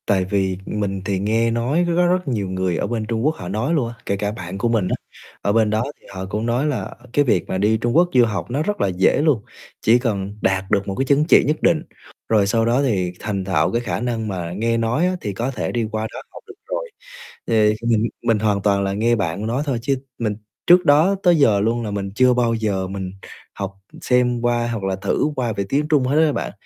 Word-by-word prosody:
Tại 95 Hz, -2 st, +2 dB
vì 95 Hz, -1 st, 0 dB
mình 100 Hz, -2 st, -3 dB
thì 95 Hz, -2 st, -1 dB
nghe 115 Hz, +3 st, +1 dB
nói 125 Hz, +9 st, +1 dB
rất 175 Hz, 0 st, +2 dB
rất 180 Hz, -1 st, 0 dB
nhiều 105 Hz, -7 st, -1 dB
người 95 Hz, -2 st, -1 dB
ở -, -, -1 dB
bên 115 Hz, -2 st, -2 dB
Trung 115 Hz, +2 st, -2 dB
Quốc 155 Hz, +1 st, +2 dB
họ 90 Hz, -, -8 dB
nói 110 Hz, -, -1 dB
luôn 140 Hz, -8 st, +1 dB
á, 115 Hz, -, -7 dB
kể 100 Hz, -, -1 dB
cả 105 Hz, +1 st, -2 dB
bạn 95 Hz, -3 st, -7 dB
của 115 Hz, +4 st, 0 dB
mình 110 Hz, -5 st, +1 dB
á, -, -, 0 dB, 0.5 s
ở 100 Hz, -, +1 dB
bên 110 Hz, -1 st, +3 dB
đó 110 Hz, +2 st, +1 dB, 0.2 s
thì -, -, -19 dB
họ 95 Hz, 0 st, -5 dB
cũng 105 Hz, +3 st, -2 dB
nói 120 Hz, +4 st, 0 dB
là 145 Hz, -4 st, -3 dB, 0.2 s
cái 145 Hz, -, +3 dB
việc 95 Hz, -9 st, +1 dB
mà -, -, -1 dB
đi 105 Hz, +3 st, +2 dB
Trung 120 Hz, +3 st, -1 dB
Quốc 175 Hz, +1 st, +5 dB
du 125 Hz, -2 st, +6 dB
học 110 Hz, +1 st, -4 dB
nó 140 Hz, +5 st, 0 dB
rất 205 Hz, +4 st, -2 dB
là -, -, +3 dB
dễ 95 Hz, +8 st, +2 dB
luôn, 150 Hz, -8 st, +2 dB, 0.4 s
chỉ 115 Hz, +3 st, +4 dB
cần 100 Hz, -5 st, -2 dB
đạt 95 Hz, 0 st, +1 dB
được 100 Hz, -1 st, +1 dB
một 100 Hz, -, -3 dB
cái 135 Hz, -, 0 dB
chứng 140 Hz, +2 st, +3 dB
chỉ -, -, +6 dB
nhất 155 Hz, +1 st, +1 dB
định, 165 Hz, -2 st, +3 dB, 0.5 s
rồi 105 Hz, -3 st, +3 dB
sau 115 Hz, +2 st, +2 dB
đó 120 Hz, +4 st, +2 dB
thì 95 Hz, -10 st, 0 dB
thành 100 Hz, -3 st, -3 dB
thạo 95 Hz, -1 st, +1 dB
cái 120 Hz, -, 0 dB
khả 120 Hz, -, -3 dB
năng 115 Hz, -2 st, -2 dB
mà 90 Hz, -4 st, -4 dB
nghe 115 Hz, +2 st, +1 dB
nói 115 Hz, +8 st, +1 dB
á 185 Hz, 0 st, +1 dB
thì 105 Hz, -3 st, -3 dB
có 120 Hz, +7 st, -2 dB
thể 125 Hz, -, -3 dB
đi 115 Hz, -2 st, -1 dB
qua 110 Hz, +1 st, -2 dB
đó -, -, -6 dB
học -, -, -12 dB
được 405 Hz, -, -12 dB
rồi. -, -, -3 dB, 0.6 s
Thì 110 Hz, -2 st, +3 dB
mình 115 Hz, -1 st, +2 dB, 0.2 s
mình 115 Hz, -2 st, +2 dB
hoàn 105 Hz, -2 st, +1 dB
toàn 100 Hz, -1 st, +2 dB
là 95 Hz, 0 st, -1 dB
nghe 115 Hz, +4 st, +2 dB
bạn 100 Hz, 0 st, -2 dB
nói 125 Hz, +5 st, -1 dB
thôi 135 Hz, -5 st, -1 dB
chứ 135 Hz, +3 st, +1 dB, 0.2 s
mình 110 Hz, -3 st, -1 dB, 0.3 s
trước 180 Hz, +1 st, +6 dB
đó 155 Hz, +6 st, +5 dB
tới 175 Hz, -1 st, +5 dB
giờ 110 Hz, -9 st, +4 dB
luôn 115 Hz, +3 st, 0 dB
là 105 Hz, -, -4 dB
mình 100 Hz, -1 st, -3 dB
chưa 130 Hz, +1 st, +5 dB
bao 120 Hz, -2 st, +1 dB
giờ 100 Hz, -4 st, -1 dB
mình 95 Hz, -1 st, -5 dB, 0.4 s
học 100 Hz, -1 st, -5 dB, 0.3 s
xem 125 Hz, -1 st, +2 dB
qua 120 Hz, -1 st, +1 dB
hoặc 115 Hz, -4 st, -3 dB
là 95 Hz, 0 st, 0 dB
thử 100 Hz, +10 st, 0 dB
qua 120 Hz, -3 st, -1 dB
về 100 Hz, -1 st, -2 dB
tiếng 145 Hz, +2 st, +1 dB
Trung 150 Hz, -4 st, +3 dB
hết 145 Hz, +5 st, +3 dB
á 155 Hz, -, +2 dB
bạn, -, -, -3 dB
115 Hz, 255 wpm, -21 LUFS, 100-130 Hz, 0.6 s, du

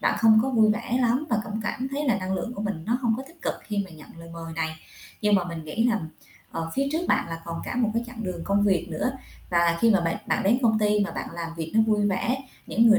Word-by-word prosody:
bạn -, -, +2 dB
không 220 Hz, -1 st, +7 dB
có 265 Hz, -, 0 dB
vui 220 Hz, -4 st, +5 dB
vẻ 235 Hz, +3 st, 0 dB
lắm 250 Hz, +5 st, +2 dB
và 220 Hz, -2 st, +2 dB
cũng 220 Hz, +1 st, -4 dB
cảm 255 Hz, +4 st, -2 dB
thấy 290 Hz, +2 st, -2 dB
là 235 Hz, -, +3 dB
năng 185 Hz, 0 st, -3 dB
lượng 235 Hz, +6 st, -3 dB
của 205 Hz, -, -4 dB
mình 190 Hz, -6 st, -3 dB
nó 240 Hz, +2 st, +2 dB
hông 230 Hz, -2 st, +3 dB
có 260 Hz, -, -5 dB
tích 335 Hz, 0 st, -19 dB
cực -, -, 0 dB
khi 205 Hz, -2 st, -1 dB
mà 190 Hz, -, -13 dB
nhận 155 Hz, -2 st, -13 dB
lời 165 Hz, 0 st, -10 dB
mời 165 Hz, -1 st, -7 dB
này. 160 Hz, -1 st, -2 dB, 0.4 s
Nhưng 210 Hz, -1 st, +3 dB
mà 185 Hz, -3 st, +3 dB
mình 165 Hz, -2 st, -6 dB
nghĩ 210 Hz, +9 st, -1 dB
là, 230 Hz, -3 st, +2 dB, 0.5 s
ờ, 165 Hz, 0 st, -3 dB
phía 275 Hz, +1 st, +1 dB
trước 335 Hz, +3 st, -1 dB
bạn -, -, +2 dB
là 165 Hz, 0 st, -5 dB
còn 165 Hz, 0 st, -4 dB
cả -, -, -4 dB
một 230 Hz, -3 st, +2 dB
cái 230 Hz, -, +1 dB
chặng 240 Hz, -2 st, -7 dB
đường 180 Hz, -3 st, -4 dB
công 200 Hz, 0 st, +2 dB
việc 180 Hz, -4 st, +2 dB
nữa 255 Hz, -, -1 dB, 0.4 s
và 170 Hz, -1 st, +3 dB
khi 230 Hz, -, +5 dB
mà 195 Hz, -4 st, +5 dB
bạn 165 Hz, 0 st, 0 dB
bạn -, -, +1 dB
đến 225 Hz, +6 st, +4 dB
công 220 Hz, -2 st, +4 dB
ty 210 Hz, -1 st, +3 dB
mà -, -, -4 dB
bạn -, -, -5 dB
làm 170 Hz, -1 st, -4 dB
việc 160 Hz, -1 st, -4 dB
nó 220 Hz, -, +6 dB
vui 210 Hz, -1 st, +3 dB
vẻ, 205 Hz, +6 st, +1 dB, 0.3 s
những 230 Hz, +1 st, +4 dB
người 215 Hz, -1 st, +7 dB
210 Hz, 285 wpm, -26 LUFS, 170-235 Hz, 0.5 s, không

